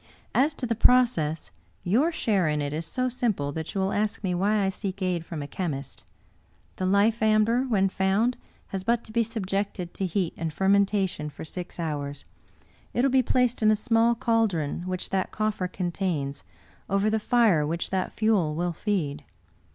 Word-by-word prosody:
As 290 +3 +3
to 255 - -3
the 230 - 0
process, 230 -10 +3 0.3
your 255 - +2
share 205 - +1
in 150 0 0
it 145 0 -2
is 160 +2 -3
so 255 -1 -1
simple 220 - -1
that 160 +4 -5
you 195 - +1
will 190 +1 0
ask 215 +1 -1
me 185 -2 0
why 205 +4 +2
I 195 - +2
seek 195 0 -5
aid 180 -3 -1
from 160 -3 -6
a - - -6
chemist. 145 -6 -4 0.7
The 185 - -1
life 205 +4 +3
amber, 220 +3 +3
when 205 -6 +2
found, 195 +6 +1 0.3
has 190 -1 -4
but 235 +3 +1
to - - -13
be 235 +1 +2
subjected 200 -4 -3
to 190 - -2
heat 180 -1 -1
and 165 -1 -3
fermentation 195 -3 +1
for 150 - -9
six 180 +2 -7
hours; 145 -3 -4 0.7
it 245 - +2
will 275 - +3
be 265 0 +5
placed 250 -1 +1
in 215 - +5
a 215 - +5
small 230 +1 +2
caldron 215 -11 0
which 185 0 -4
that 190 -1 0
coffer 215 -4 -1
contains, 175 -6 -3 0.5
over 195 +2 +2
the 220 - +1
fire 215 -8 +3
which 165 +3 -3
that 190 -1 -1
fuel 200 -9 +1
will 175 +1 -1
feed. 155 -7 -2
195 Hz, 180 wpm, -26 LUFS, 170-225 Hz, 0.7 s, be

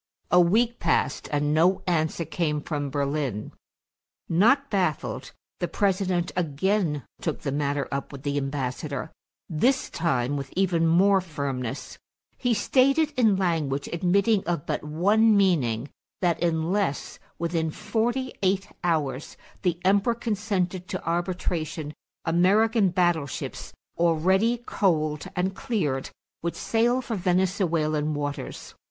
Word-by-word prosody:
A 180 - +6
week 225 +7 +2
passed 135 - 0
and 145 0 +1
no 180 +4 +3
answer 165 -1 0
came 155 -1 -1
from 145 -3 -3
Berlin. 140 -6 -2 0.8
Not 245 - +3
baffled, 180 -8 -1 0.3
the 175 - -1
President 185 -3 0
again 170 - 0 0.2
took - - -2
the 140 - -2
matter 140 0 -1
up 140 0 -3
with 140 -1 -9
the 145 0 -1
ambassador, 135 +1 -3 0.4
this 245 - +1
time 145 -5 0
with 135 -1 -6
even 175 -3 +2
more 190 +4 +4
firmness; 140 -7 -4 0.4
he 245 - +1
stated 275 +8 +3
in 225 -5 +4
language 160 -7 0
admitting 195 +4 +2
of 170 -4 -2
but - - -2
one 205 +8 +3
meaning 140 - +2 0.3
that, 175 -3 +1
unless 170 +1 -1 0.2
within 165 -1 -1
forty 240 +9 -1
eight 195 +1 +1
hours 150 -5 -1 0.2
the 175 -3 0
Emperor 200 +4 +3
consented 200 -5 -2
to 190 -3 -4
arbitration, 165 -3 -2 0.3
American 200 +5 +3
battleships, 175 -6 -1 0.3
already 190 +8 +3
coaled 155 -6 0
and 185 +2 0
cleared, 150 - -1 0.3
would 170 0 -2
sail 240 +3 +1
for 230 - -3
Venezuelan 170 -5 +1
waters. 145 0 -5
175 Hz, 120 wpm, -26 LUFS, 150-195 Hz, 0.8 s, A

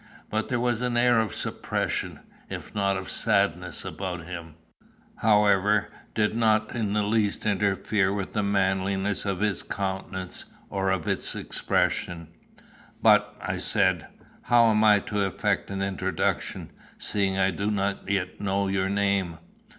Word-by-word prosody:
But 110 +1 -1
there 120 -2 0
was 120 -1 0
an 125 -1 0
air 120 -1 +4
of 110 -1 -1
suppression, - - -2 0.3
if - - -7
not 100 -1 +1
of 95 0 -6
sadness, 90 -6 0
about 90 -3 -5
him, 85 -3 -8 0.6
however, 105 -1 +3 0.3
did 105 -1 +2
not 110 -1 +2
in 105 -4 -1
the 105 0 +2
least 105 0 0
interfere 100 -1 +1
with 100 -1 -3
the 105 - +1
manliness 95 0 0
of 95 -1 -2
his 105 -3 +1
countenance, 95 -1 -3 0.3
or 95 -1 0
of 95 -5 -1
its - - 0
expression. 85 -2 -1 0.7
"But," - - +4
I - - -3
said, 95 -5 +2 0.3
"how 120 -1 +5
am 110 0 +3
I 105 -1 +7
to 105 -1 -1
effect 95 -3 -1
an 100 0 -2
introduction, 95 -3 -2 0.3
seeing 95 -2 0
I 95 0 +3
do 100 +4 -2
not 100 -1 -1
yet 95 -2 -1
know 100 0 0
your 95 0 0
name." 100 -4 0
100 Hz, 145 wpm, -26 LUFS, 95-105 Hz, 0.7 s, I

